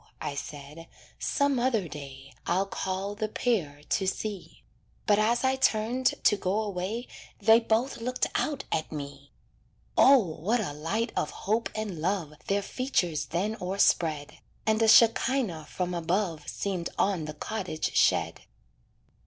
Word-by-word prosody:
I 145 - -3
said, 145 +3 -8 0.3
"some 280 -2 +1
other 235 -7 +1
day 140 -2 -10
I'll 190 +2 +2
call 195 0 -3
the 215 +1 -2
pair 175 - -1
to 190 - +1
see." 205 0 -4 0.4
But 205 -1 +4
as 230 +4 +2
I 260 0 +3
turned 245 +1 +2
to - - +5
go 195 +1 -1
away 205 +4 -3 0.3
They 225 +2 +6
both 230 +3 0
looked 250 +2 -1
out 285 -3 -1
at 155 - -1
me. 140 -2 -7 0.6
O! 275 +1 +8
what 200 +2 0
a 185 -9 -3
light 200 +11 -2
of 150 - 0 0.2
hope 220 +3 +1
and 210 -7 -4
love 175 -3 -1
Their 200 0 +1
features 180 - -1
then 200 - -1
o'erspread; 165 -5 +1 0.3
And 220 0 +2
a 225 - +4
shekinah 225 - +4
from 180 -1 -3
above 170 -2 -1
Seemed 185 -4 -3
on 190 -6 +1
the 155 0 -6
cottage 185 -3 -3
shed. - - +2
195 Hz, 145 wpm, -28 LUFS, 160-225 Hz, 0.6 s, O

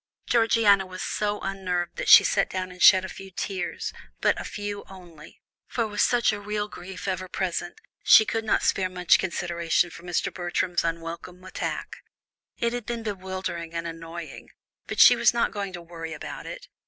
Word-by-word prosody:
Georgiana 225 -4 +4
was 185 0 -7
so 210 0 -1
unnerved 180 -3 -3
that - - -2
she - - +10
sat 195 - +1
down 185 0 -4
and 180 -1 -12
shed 190 -1 +7
a - - -5
few 190 +1 -10
tears, 185 -1 -4 0.3
but - - +1
a - - -5
few 205 -1 -5
only, 175 -5 -14 0.2
for 235 - -1
with 210 -1 -2
such 240 -3 +3
a 205 - -4
real 210 0 -3
grief 190 -1 -9
ever 185 -1 -2
present, 180 - -3 0.2
she 220 - +8
could 225 +1 -2
not 215 - +1
spare 185 -1 +1
much 180 -1 +3
consideration 175 -1 0
for - - -11
Mr. 180 +2 -2
Bertram's 175 0 -1
unwelcome 170 +2 -5
attack. 185 - -5 0.6
It 235 0 0
had 245 -3 -5
been 235 -1 -3
bewildering 185 -4 -5
and 165 0 -3
annoying, 165 0 -8 0.4
but - - -4
she - - +9
was - - +3
not 235 - +1
going 200 -2 -4
to 175 -1 -7
worry 165 -1 -7
about 150 - -8
it. - - -8
185 Hz, 180 wpm, -26 LUFS, 175-205 Hz, 0.6 s, she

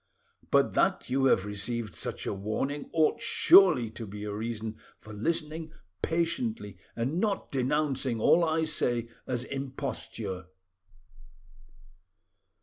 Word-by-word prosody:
But - - +3
that - - +1
you 135 +1 +2
have 100 -7 +4
received 105 +2 -3
such - - -4
a - - -1
warning 110 +9 -3
ought 160 +7 +2
surely 175 - +6
to 115 -1 -7
be 105 +1 -7
a 105 -1 -4
reason 110 0 -4 0.2
for 110 - -11
listening 155 +6 -2 0.3
patiently 170 - -1 0.2
and 130 +9 -1
not 205 -1 -1
denouncing 135 -2 0
all 170 +9 +5
I 160 0 +1
say 120 -7 0 0.2
as 125 -1 -1
imposture." 130 -8 -5
130 Hz, 120 wpm, -29 LUFS, 110-155 Hz, 0.3 s, surely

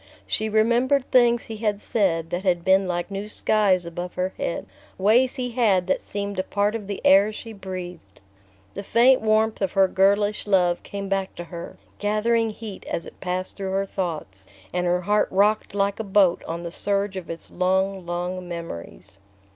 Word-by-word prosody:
She 220 0 -1
remembered 240 +5 +2
things 240 -2 +4
he 220 - -7
had 210 -2 -1
said 170 -7 0
that 175 +1 -1
had 175 -3 0
been 190 0 +4
like 175 +2 -3
new 195 +1 -4
skies 200 -5 +2
above 175 +1 -6
her 185 +1 -1
head: 170 - -2 0.3
ways 230 +7 +3
he 250 -1 -3
had 210 -7 +2
that 185 - 0
seemed 200 -1 -4
a - - +1
part 205 +2 0
of 215 -4 -5
the 200 -1 -4
air 200 +3 +6
she 225 +1 -8
breathed. 180 - -8 0.5
The - - -5
faint 240 +6 +4
warmth 220 0 +2
of 195 -2 0
her 195 -1 +5
girlish 205 +3 +2
love 180 -3 +3
came 200 -1 -6
back 195 -1 -2
to 175 - -6
her, 170 0 -9 0.2
gathering 225 +2 +1
heat 215 -2 -8
as 170 - -3
it - - -13
passed 185 0 -3
through 190 -1 -3
her 195 +1 +1
thoughts; 155 - -5 0.3
and 180 0 0
her 180 +1 +1
heart 210 +3 +2
rocked 205 +2 +2
like 200 +1 0
a - - -1
boat 195 -3 +3
on 170 +1 -4
the 170 - -5
surge 200 +1 -1
of 185 -3 -6
its 165 - -8
long 190 +1 0
long 180 +1 -4
memories. 165 - -8
195 Hz, 185 wpm, -24 LUFS, 180-210 Hz, 0.5 s, air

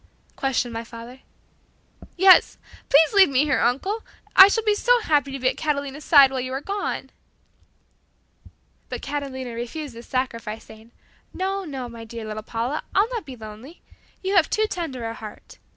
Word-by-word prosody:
questioned 255 -3 -1
my 230 0 -4
father. 235 +2 -11 1.0
"Yes, 380 +1 +6 0.3
please 310 +5 +5
leave 395 -5 +6
me 270 +1 +3
here, 290 -3 +1
uncle, 380 - 0 0.3
I 385 - +11
shall 450 +2 0
be 425 -1 +3
so 485 +4 +3
happy 290 - +1
to 270 - -4
be 255 -1 -1
at 255 - 0
Catalina's 285 -1 -3
side 280 -4 +7
while 265 - -2
you 255 +1 -4
are 265 - -2
gone." 400 +7 -4 1.8
But - - -6
Catalina 270 -3 -5
refused 245 +4 -6
this 235 +1 -12
sacrifice, 230 -4 -3
saying, 220 +1 -16 0.4
"No, 385 +1 -2
no, 270 -5 -6
my 230 -1 -10
dear 225 0 -8
little 215 0 -5
Paula. 235 +7 -3
I'll 410 +4 +3
not 465 -10 -5
be 260 - -8
lonely. 220 +8 -12 0.4
You 385 +1 -1
have 340 - +4
too 435 - +1
tender 295 - -4
a 225 - -4
heart. 215 -2 -11
270 Hz, 170 wpm, -23 LUFS, 235-345 Hz, 1.8 s, I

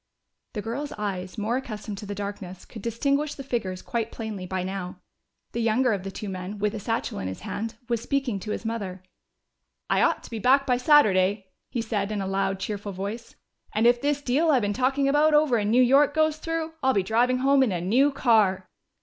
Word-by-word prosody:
The 210 - -4
girls' 280 +6 -4
eyes, 195 -2 -4
more 220 +4 0
accustomed 210 -5 -6
to 210 - -8
the 205 - -4
darkness, 200 -2 -6
could 220 - -10
distinguish 280 +7 0
the 275 - -7
figures 205 -8 -3
quite 230 -2 -2
plainly 215 -5 -6
by 185 0 -2
now. 185 -1 -5 0.5
The 235 - -2
younger 230 +2 +2
of 200 - -2
the 195 - -5
two 205 +2 -7
men, 190 +2 -5
with 210 +1 0
a 220 - -4
satchel 225 +3 -2
in 95 - -3
his 95 - -6
hand, 225 +1 -4
was 235 -2 -1
speaking 270 -6 -1
to 215 - -8
his 225 - -4
mother. 195 -5 -4 0.9
"I - - +3
ought - - +2
to - - -12
be 225 - -4
back 270 +5 +4
by 250 -1 +2
Saturday," 200 -8 +4 0.2
he 235 - -2
said 210 -2 -2
in 210 - -2
a 195 - -2
loud, 195 0 -1
cheerful 205 0 -4
voice. 200 +5 -6 0.4
"And 220 +2 +2
if 240 0 +5
this 285 0 0
deal 290 +6 +2
I've 260 -7 +4
been 205 0 0
talking 270 +4 +1
about 300 +2 +4
over 295 -6 +4
in 205 0 0
New 250 +3 +5
York 280 +4 +4
goes 310 -1 +2
through, 325 0 -3
I'll 265 -1 +3
be 195 - +2
driving 240 +5 +2
home 270 +1 +4
in 255 -5 +3
a 180 - -1
new 245 +11 +3
car." 215 -8 +2
225 Hz, 220 wpm, -26 LUFS, 195-265 Hz, 0.9 s, if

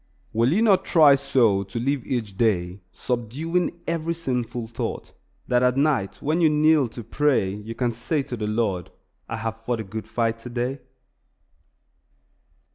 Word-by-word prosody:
Will 115 +4 +3
you 210 +7 +3
not 195 -4 +4
try 155 -4 +6
so 130 -8 +3
to 100 +4 -5
live 135 +1 0
each 110 -6 -2
day, 95 -4 0
subduing 160 +9 -2
every 165 0 -1
sinful 125 -6 -3
thought, 115 +1 -5 0.3
that 125 0 +3
at 125 +1 +2
night 140 -9 0
when 155 +4 +1
you 160 - +5
kneel 150 -2 +4
to 115 +1 -9
pray 125 -5 +1
you 105 +3 -7
can 120 0 0
say 135 +6 -2
to 125 - -5
the 105 -2 -3
Lord, 105 -5 -1 0.4
"I 115 - -3
have 115 0 -5
fought 120 0 -1
a - - -5
good 110 +2 -7
fight 115 -1 -1
today"? 125 +3 -3
120 Hz, 160 wpm, -24 LUFS, 110-145 Hz, 0.4 s, try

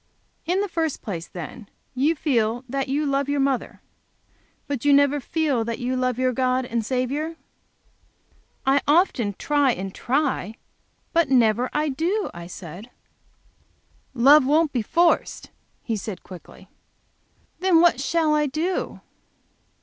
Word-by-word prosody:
"In 365 +3 +1
the 410 - -1
first 325 -5 -2
place, 175 -5 -5
then, 185 +5 -9 0.2
you 285 +6 +1
feel 240 -5 0
that 270 +1 -3
you 290 +3 0
love 275 0 0
your 285 0 0
mother? 270 -2 -1 0.9
But 280 -4 -3
you 290 0 +4
never 285 +1 +4
feel 285 -3 0
that 230 0 -4
you 255 +1 -2
love 255 -1 0
your 255 0 +1
God 255 +1 0
and 235 -1 -2
Saviour?" 270 +7 -2 1.3
"I 270 +1 +3
often 290 - +2
try, 290 -4 +2
and 190 0 -6
try, 265 -5 -1 0.6
but 335 -4 +3
I 270 - +3
never 240 +1 +3 0.3
do," 385 +8 -1
I 170 0 -9
said. 180 +5 -10 1.3
"Love 275 +5 +7
won't 305 +3 +2
be 245 - 0
forced," 335 +10 +1 0.3
he 225 - -2
said, 205 -2 -6
quickly. 180 -1 -13 0.9
"Then 370 -3 +4
what 335 -6 +4
shall 315 +1 +1
I 300 -1 +2
do?" 325 +7 -3
270 Hz, 140 wpm, -23 LUFS, 235-300 Hz, 1.3 s, Love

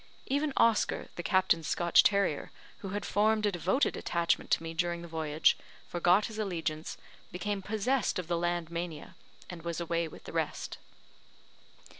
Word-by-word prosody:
Even 285 +2 0
Oscar, 230 -2 +2
the - - -4
Captain's 185 -4 +2
Scotch 175 +2 +5
terrier, 200 -7 +1 0.3
who 195 - -6
had 205 +2 -3
formed 215 +1 +2
a 205 - +2
devoted 190 - +1
attachment 170 -1 0
to - - +2
me 165 0 -5
during 170 0 -1
the - - -7
voyage, 160 -2 +2 0.3
forgot 175 +4 +3
his 220 -1 -6
allegiance, 165 -6 -3 0.3
became 195 +3 -2
possessed 220 +5 0
of 180 -3 -4
the 175 - 0
land 175 -1 -1
mania, 170 -3 -5 0.3
and 175 -2 -8
was 170 0 -3
away 170 0 -1
with 155 - -12
the - - -9
rest. - - -2
175 Hz, 160 wpm, -31 LUFS, 170-205 Hz, 0.3 s, Scotch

